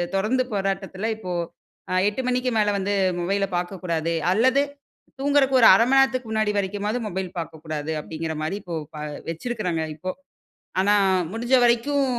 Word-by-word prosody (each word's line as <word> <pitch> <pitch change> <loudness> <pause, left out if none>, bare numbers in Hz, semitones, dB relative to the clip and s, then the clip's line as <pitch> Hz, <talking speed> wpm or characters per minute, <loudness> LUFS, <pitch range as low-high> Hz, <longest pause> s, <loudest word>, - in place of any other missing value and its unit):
தொடர்ந்து 220 +7 +1
போராட்டத்தில 195 +1 -2
இப்போ 185 -5 -6 0.6
அ - - 0 0.2
8 210 +5 -4
மணிக்கு 250 0 +1
மேல 210 -1 +2
வந்து 200 +1 -1 0.3
மொபைல 195 +3 0
பார்க்கக்கூடாது 175 -2 -2 0.2
அல்லது 260 +7 +4 0.6
தூங்குறக்கு 275 -1 +3
ஒரு 225 - +9
1/2 230 +5 +5
மண 270 - +4
நேரத்துக்கு 255 -3 +2
முன்னாடி 215 -1 +1
வரைக்குமாவது 205 +4 -1
மொபைல் 190 -1 -3
பார்க்கக்கூடாது 160 -2 -5
அப்டிங்கிற 160 +1 -5
மாரி 155 +5 -2
இப்போ 175 -2 -5 0.2
ப - - -7 0.3
வச்சிருக்கிறாங்க 180 -2 -2
இப்போ. 185 +4 -4 0.7
ஆனா 205 +2 +4 0.4
முடிஞ்ச 235 +4 -2
வரைக்கும் 275 +4 +2
205 Hz, 145 wpm, -24 LUFS, 180-240 Hz, 0.7 s, ஒரு